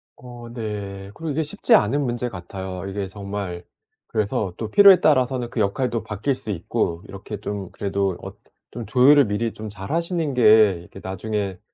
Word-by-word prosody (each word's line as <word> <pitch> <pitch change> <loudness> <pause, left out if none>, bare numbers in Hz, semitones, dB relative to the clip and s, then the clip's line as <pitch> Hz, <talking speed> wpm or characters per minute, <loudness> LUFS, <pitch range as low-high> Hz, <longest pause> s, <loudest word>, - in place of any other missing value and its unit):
어 120 -1 -11
네. 100 -4 -5
그리고 160 -2 -4
이게 160 +3 0
쉽지 150 - 0
않은 130 +8 +4
문제 120 0 -2
같아요. 95 0 -7
이게 100 0 -3
정말 100 -3 -6 0.4
그래서 105 -3 -1
또 110 -2 -4
필요에 195 - +8
따라서는 130 -5 +2
그 115 - -4
역할도 115 +3 0
바뀔 110 +5 -2
수 110 - -6
있고 85 -1 -2
이렇게 100 +1 -8
좀 100 -3 -5
그래도 100 -2 -1
어 - - -7 0.4
좀 115 -3 -6
조율을 135 +4 +6
미리 105 +2 -2
좀 110 0 -7
잘하시는 160 - -2
게 110 -4 +6
이렇게 90 +2 -13
나중에 95 0 -3
105 Hz, 340 characters per minute, -23 LUFS, 100-125 Hz, 0.4 s, 필요에